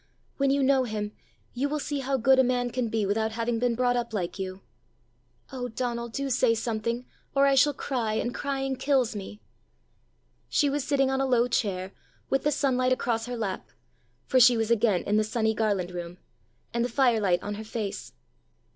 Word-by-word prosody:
When 275 Hz, -1 st, +2 dB
you 275 Hz, 0 st, +2 dB
know 265 Hz, -1 st, +3 dB
him, 210 Hz, -2 st, -3 dB, 0.4 s
you 270 Hz, +4 st, -1 dB
will 300 Hz, -, -1 dB
see 290 Hz, -1 st, -3 dB
how 270 Hz, 0 st, 0 dB
good 265 Hz, +2 st, +4 dB
a -, -, +7 dB
man 245 Hz, -1 st, 0 dB
can 250 Hz, -1 st, -1 dB
be 220 Hz, -1 st, 0 dB
without 220 Hz, +2 st, 0 dB
having 230 Hz, 0 st, -1 dB
been 240 Hz, -1 st, +1 dB
brought 245 Hz, 0 st, +2 dB
up 235 Hz, -2 st, -2 dB
like 185 Hz, 0 st, -3 dB
you! 190 Hz, 0 st, -5 dB, 0.9 s
Oh, 250 Hz, -2 st, -4 dB
Donal, 235 Hz, 0 st, -3 dB
do 275 Hz, +5 st, -3 dB
say 245 Hz, -2 st, +3 dB
something, 230 Hz, +2 st, -2 dB, 0.3 s
or 275 Hz, 0 st, +5 dB
I 275 Hz, -, +4 dB
shall 285 Hz, +1 st, +4 dB
cry, 235 Hz, -7 st, -2 dB
and 240 Hz, +2 st, -1 dB
crying 270 Hz, -1 st, -2 dB
kills 260 Hz, -5 st, +1 dB
me!" 205 Hz, +1 st, -7 dB, 1.1 s
She 290 Hz, -2 st, +2 dB
was 290 Hz, -1 st, -1 dB
sitting 275 Hz, -1 st, +1 dB
on 265 Hz, 0 st, 0 dB
a 270 Hz, -, +1 dB
low 245 Hz, -1 st, +3 dB
chair, 195 Hz, -6 st, -1 dB, 0.4 s
with 270 Hz, -, +2 dB
the 295 Hz, -, +2 dB
sunlight 255 Hz, -3 st, +1 dB
across 235 Hz, -2 st, 0 dB
her 245 Hz, 0 st, -4 dB
lap 200 Hz, -4 st, -4 dB, 0.6 s
for 260 Hz, -, +3 dB
she 245 Hz, -1 st, +7 dB
was 225 Hz, 0 st, 0 dB
again 215 Hz, -5 st, +3 dB
in 210 Hz, +1 st, +1 dB
the 215 Hz, -, +3 dB
sunny 220 Hz, 0 st, 0 dB
Garland 200 Hz, -5 st, 0 dB
room 175 Hz, 0 st, -6 dB, 0.6 s
and 235 Hz, 0 st, +1 dB
the 245 Hz, -, -1 dB
firelight 225 Hz, -8 st, +2 dB
on 205 Hz, -, -3 dB
her 210 Hz, +1 st, -6 dB
face. 215 Hz, -2 st, -5 dB
240 Hz, 195 wpm, -27 LUFS, 215-265 Hz, 1.1 s, a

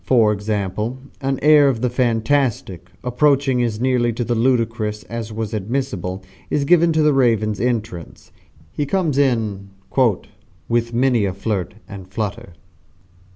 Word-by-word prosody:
For 115 Hz, -5 st, +3 dB
example, 105 Hz, +3 st, -3 dB, 0.2 s
an 135 Hz, 0 st, -1 dB
air 150 Hz, -2 st, +6 dB
of 120 Hz, -4 st, -2 dB
the 125 Hz, -, +1 dB
fantastic 115 Hz, -6 st, 0 dB
approaching 135 Hz, 0 st, +2 dB
as 115 Hz, -3 st, -1 dB
nearly 125 Hz, -1 st, +1 dB
to 120 Hz, -, -2 dB
the 120 Hz, -, -1 dB
ludicrous 115 Hz, -3 st, 0 dB
as 115 Hz, -1 st, -6 dB
was 110 Hz, 0 st, -4 dB
admissible 100 Hz, -4 st, -3 dB, 0.3 s
is 145 Hz, -1 st, 0 dB
given 170 Hz, +1 st, +4 dB
to 155 Hz, 0 st, +2 dB
the 150 Hz, -1 st, +4 dB
Raven's 110 Hz, -6 st, +2 dB
entrance. 115 Hz, -8 st, -3 dB, 0.4 s
He 145 Hz, -, -3 dB
comes 160 Hz, -6 st, 0 dB
in 110 Hz, -8 st, 0 dB, 1.0 s
"with 115 Hz, 0 st, 0 dB
many 120 Hz, -2 st, +2 dB
a 95 Hz, -, -2 dB
flirt 100 Hz, -3 st, -3 dB
and 95 Hz, -3 st, -9 dB
flutter." 100 Hz, -2 st, -5 dB
115 Hz, 140 wpm, -20 LUFS, 105-130 Hz, 1.0 s, air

